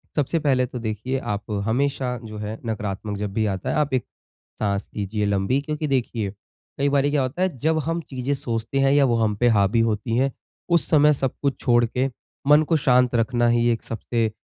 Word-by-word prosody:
सबसे 150 +3 +1
पहले 135 -4 +2
तो 125 0 -7
देखिए 115 +4 -3
आप 105 -5 -3 0.2
हमेशा 130 +1 0
जो 110 -1 -8
है 105 +1 -5
नकारात्मक 105 -2 -3
जब 100 -1 -4
भी 110 +1 +1
आता 95 -3 -2
है - - 0
आप 150 -2 0
एक, 130 -3 +1 0.5
साँस 100 -1 -1
लीजिए 105 0 -1
लम्बी 100 +7 +1
क्योंकि 150 +1 -3
देखिए 120 -6 -1 0.5
कई 140 +1 +2
बारी 140 0 +2
क्या 145 -1 +2
होता 130 +8 -2
है 185 -6 0
जब 160 +4 +1
हम 165 +1 -1
चीज़ें 130 +1 -2
सोचते 120 -2 -3
हैं 135 0 +4
या 145 0 +5
वो 120 -3 +2
हम 110 -2 +1
पे 120 +3 +3
हावी 105 0 +3
होती 115 +1 0
है, 135 +2 +2 0.4
उस 170 -2 +2
समय 150 -1 +5
सब 135 -3 -1
कुछ 140 -2 +1
छोड़ 120 -2 +3
के 125 +3 0 0.4
मन 150 +1 +7
को 165 - +3
शांत 125 -3 +3
रखना 120 +1 +2
ही 120 0 +3
एक 115 - -1
सबसे 115 0 -2
120 Hz, 210 wpm, -23 LUFS, 110-140 Hz, 0.5 s, मन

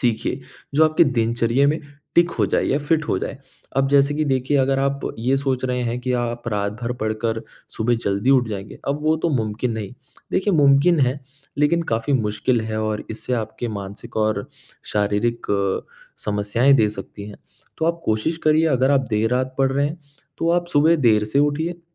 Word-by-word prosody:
सीखिए 120 -3 0 0.3
जो 160 - +5
आपके 155 +2 +4
दिनचर्या 120 0 +1
में 155 +2 0 0.3
टिक 170 0 +4
हो - - +4
जाए - - +1
या 140 - +1
फ़िट 155 +1 0
हो - - +1
जाए। 135 - -5 0.4
अब 135 0 +3
जैसे 140 +1 +3
कि 155 +1 0
देखिए 135 +1 +1
अगर 135 0 +2
आप 140 0 0 0.2
ये 130 +4 +1
सोच 135 -2 -1
रहे 125 -1 -1
हैं, 120 0 -2
कि 125 0 -2
आप 120 -1 -2
रात 100 -1 -1
भर 120 +1 -1
पढ़कर 110 +1 -1 0.4
सुबह 120 +2 +1
जल्दी 100 +6 +1
उठ 125 -4 +4
जाएँगे, 100 -1 -6
अब 140 +1 0
वो 155 +1 +3
तो 160 - -1
मुमकिन 115 -2 -1
नहीं। 110 -2 -5 0.4
देखिए 200 +2 +1
मुमकिन 145 +3 +5
है 130 +1 +1 0.4
लेकिन 165 +4 +3
काफ़ी 115 +5 0
मुश्किल 115 +1 0
है 110 0 -3
और 110 -1 -2
इससे 110 +3 -5
आपके 115 +1 -4
मानसिक 100 +3 -7
और 110 +5 0 0.4
शारीरिक 105 +3 0 0.8
समस्याएँ 105 +6 +2
दे 110 -5 +4
सकती 105 -1 -8
हैं। 105 - -10 0.4
तो - - 0
आप 170 0 0
कोशिश 110 +10 0
करिए 155 +1 +4
अगर 130 -2 +2
आप 135 -2 +2
देर 110 +1 +1
रात 130 +1 -1
पढ़ 135 0 +2
रहे 140 +1 +1
हैं 160 +4 -5 0.4
तो 165 - +1
आप 175 0 +1
सुबह 155 +3 +4
देर 110 -7 +3
से 110 +6 0
उठिए। 160 +4 0
125 Hz, 190 wpm, -22 LUFS, 110-145 Hz, 0.8 s, जो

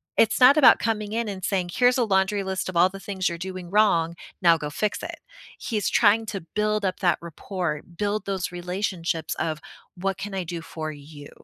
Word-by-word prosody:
It's 225 +2 +3
not 265 +4 +7
about 290 - +8
coming 215 -2 -2
in 230 0 -1
and 195 -3 -6
saying, 185 -2 -1
"Here's 250 +1 +4
a 250 - +3
laundry 195 0 +1
list 190 -1 -3
of 180 - -3
all 175 +2 +6
the 195 - -9
things 195 -1 -2
you're 170 - -2
doing 185 -1 -7
wrong. 185 -6 +3 0.3
Now 170 -1 +6
go 150 - -4
fix 205 +8 -2
it." - - -6 0.4
He's 215 -5 -2
trying 220 0 +3
to 195 -2 -4
build 210 -1 +1
up 185 - -2
that 175 -4 +2
rapport, 170 -1 -4 0.2
build 210 +1 -1
those 190 -3 -2
relationships 175 -2 -3
of 155 -2 -2 0.4
"What 195 +1 -2
can 195 0 -6
I 190 - -2
do 170 0 -5
for 155 -1 -6
you?" 145 0 -12
190 Hz, 205 wpm, -25 LUFS, 170-210 Hz, 0.4 s, about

